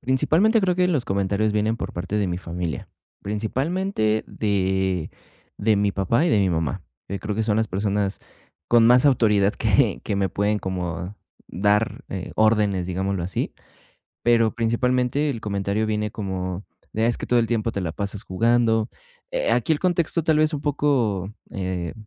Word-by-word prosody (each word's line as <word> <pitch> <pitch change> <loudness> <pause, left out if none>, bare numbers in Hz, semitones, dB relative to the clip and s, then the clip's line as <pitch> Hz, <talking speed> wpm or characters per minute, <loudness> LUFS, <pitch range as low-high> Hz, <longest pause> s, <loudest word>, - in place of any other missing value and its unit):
principalmente, 170 - +3
creo 180 -2 +2
que 180 - +3
los 145 -8 +1
comentarios 100 +2 0
vienen 110 +2 +1
por - - -4
parte 95 +4 -3
de 100 -2 +1
mi 90 - -2
familia, 85 -2 -5 0.3
principalmente 110 - -1
de 95 -4 -1 0.5
de 105 0 +2
mi 100 0 +1
papá 115 - +1
y 175 - +2
de 105 - +4
mi 95 -2 +3
mamá, 85 +2 -2 0.3
eh, 100 - -4
que 100 - -2
creo 105 -1 -3
que 110 - +1
son 105 -1 +1
las 110 -1 +1
personas 100 +1 -1 0.5
con 120 -1 +5
más 125 +3 +6
autoridad 105 -7 +4
que, 110 0 +2
que 100 - -1
me 95 -1 +1
pueden 105 +2 0
como 90 0 -4 0.3
dar, 105 +5 0
eh, 95 -2 -5
órdenes, 105 -4 +2
digámoslo 95 0 -2
así, 90 +2 -3 0.7
pero 115 -2 +3
principalmente 125 +4 +1
el 115 -5 -4
comentario 100 +1 -1
viene 105 -1 -1
como, 95 -2 -4 0.3
de: 110 +1 0
"Ah, - - +3
es 120 - +1
que - - -5
todo 120 - +3
el 115 - +2
tiempo 115 -1 0
te 100 - -3
la 80 - -3
pasas 100 +1 -4
jugando". 115 +2 +2 0.4
Eh, - - 0
aquí 165 - +2
el 150 - +1
contexto 170 -2 +1
tal 155 -2 +3
vez 155 0 +2
un 145 - -4
poco, 125 -10 0 0.2
eh 90 -3 -3
105 Hz, 180 wpm, -23 LUFS, 95-120 Hz, 0.7 s, más